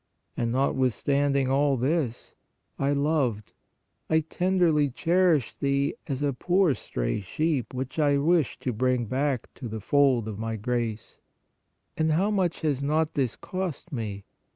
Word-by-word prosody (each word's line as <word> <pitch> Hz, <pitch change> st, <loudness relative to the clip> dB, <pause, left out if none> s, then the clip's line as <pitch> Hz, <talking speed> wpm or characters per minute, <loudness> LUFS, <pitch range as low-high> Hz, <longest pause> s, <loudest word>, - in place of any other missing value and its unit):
And 115 Hz, -1 st, -1 dB
notwithstand 140 Hz, +2 st, +1 dB
ing 135 Hz, -2 st, +2 dB
all 140 Hz, +1 st, +2 dB
this, 130 Hz, -1 st, -1 dB, 0.5 s
I 140 Hz, +1 st, +1 dB
loved, 140 Hz, -7 st, 0 dB, 0.6 s
I 160 Hz, 0 st, +4 dB
tenderly 165 Hz, -3 st, +2 dB
cherished 165 Hz, -1 st, +1 dB
thee 140 Hz, 0 st, +1 dB
as 140 Hz, -1 st, -2 dB
a 140 Hz, -1 st, +1 dB
poor 180 Hz, +3 st, +2 dB
stray -, -, -3 dB
sheep 150 Hz, -, -1 dB
which 130 Hz, +4 st, -4 dB
I 145 Hz, -2 st, +3 dB
wished 155 Hz, 0 st, +1 dB
to 125 Hz, -, -2 dB
bring 125 Hz, +1 st, +1 dB
back 130 Hz, +1 st, -1 dB
to 125 Hz, -, -7 dB
the 110 Hz, 0 st, -5 dB
fold 130 Hz, -1 st, +3 dB
of 105 Hz, -1 st, -5 dB
My 115 Hz, 0 st, -3 dB
grace. 115 Hz, 0 st, -3 dB, 0.8 s
And 160 Hz, 0 st, +1 dB
how 195 Hz, +6 st, +2 dB
much 185 Hz, -5 st, 0 dB
has 145 Hz, -4 st, 0 dB
not 155 Hz, +2 st, +1 dB
this 130 Hz, -6 st, 0 dB
cost 185 Hz, -4 st, -5 dB
Me? 105 Hz, -6 st, -4 dB
140 Hz, 150 wpm, -26 LUFS, 120-155 Hz, 0.8 s, I